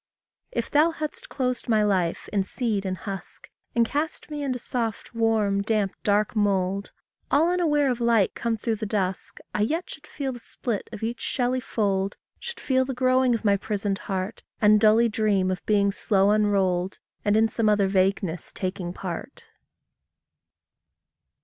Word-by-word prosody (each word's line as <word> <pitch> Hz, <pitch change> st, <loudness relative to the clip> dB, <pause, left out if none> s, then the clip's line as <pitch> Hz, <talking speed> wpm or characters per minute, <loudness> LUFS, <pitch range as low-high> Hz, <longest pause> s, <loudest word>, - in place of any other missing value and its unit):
If -, -, -3 dB
thou 300 Hz, +3 st, +5 dB
hadst 330 Hz, +10 st, -5 dB
closed 250 Hz, -2 st, -2 dB
my 215 Hz, -2 st, +4 dB
life 185 Hz, -5 st, 0 dB
in 200 Hz, -, +3 dB
seed 205 Hz, -1 st, -1 dB
and 185 Hz, 0 st, -2 dB
husk, 195 Hz, +2 st, -6 dB, 0.2 s
And 235 Hz, -1 st, +4 dB
cast 305 Hz, +3 st, -3 dB
me 295 Hz, -1 st, -3 dB
into 265 Hz, -3 st, -1 dB
soft, 230 Hz, -3 st, -3 dB
warm, 220 Hz, -3 st, +2 dB
damp, 210 Hz, -2 st, 0 dB
dark 210 Hz, +2 st, +2 dB
mould, 200 Hz, -1 st, +1 dB, 0.4 s
All 320 Hz, +5 st, +4 dB
unaware 305 Hz, -5 st, +2 dB
of 240 Hz, -1 st, -3 dB
light 230 Hz, -4 st, +3 dB
come 230 Hz, -1 st, -1 dB
through 220 Hz, 0 st, -1 dB
the 215 Hz, -, -4 dB
dusk, 195 Hz, -3 st, -2 dB, 0.2 s
I -, -, 0 dB
yet 320 Hz, +12 st, -1 dB
should -, -, -11 dB
feel 275 Hz, -3 st, -3 dB
the 245 Hz, -, -8 dB
split 230 Hz, -2 st, -4 dB
of 220 Hz, -2 st, -7 dB
each 235 Hz, +2 st, -3 dB
shelly 255 Hz, -1 st, 0 dB
fold, 200 Hz, -4 st, -1 dB, 0.2 s
Should 475 Hz, -1 st, -7 dB
feel 260 Hz, -1 st, +2 dB
the 260 Hz, 0 st, -4 dB
growing 255 Hz, -1 st, +3 dB
of 225 Hz, -, -5 dB
my 200 Hz, -1 st, +4 dB
prisoned 200 Hz, -1 st, -2 dB
heart, 190 Hz, +2 st, -4 dB, 0.2 s
And 210 Hz, 0 st, +6 dB
dully 220 Hz, +2 st, +6 dB
dream 205 Hz, -4 st, +1 dB
of 185 Hz, -, -4 dB
being 200 Hz, -1 st, +3 dB
slow 200 Hz, 0 st, +2 dB
unrolled, 195 Hz, -3 st, +1 dB, 0.3 s
And 205 Hz, +1 st, +3 dB
in 225 Hz, 0 st, +5 dB
some 220 Hz, 0 st, +1 dB
other 205 Hz, -2 st, +3 dB
vagueness 190 Hz, -2 st, 0 dB
taking 185 Hz, -2 st, -4 dB
part. 185 Hz, +8 st, -6 dB
215 Hz, 165 wpm, -25 LUFS, 195-245 Hz, 0.4 s, And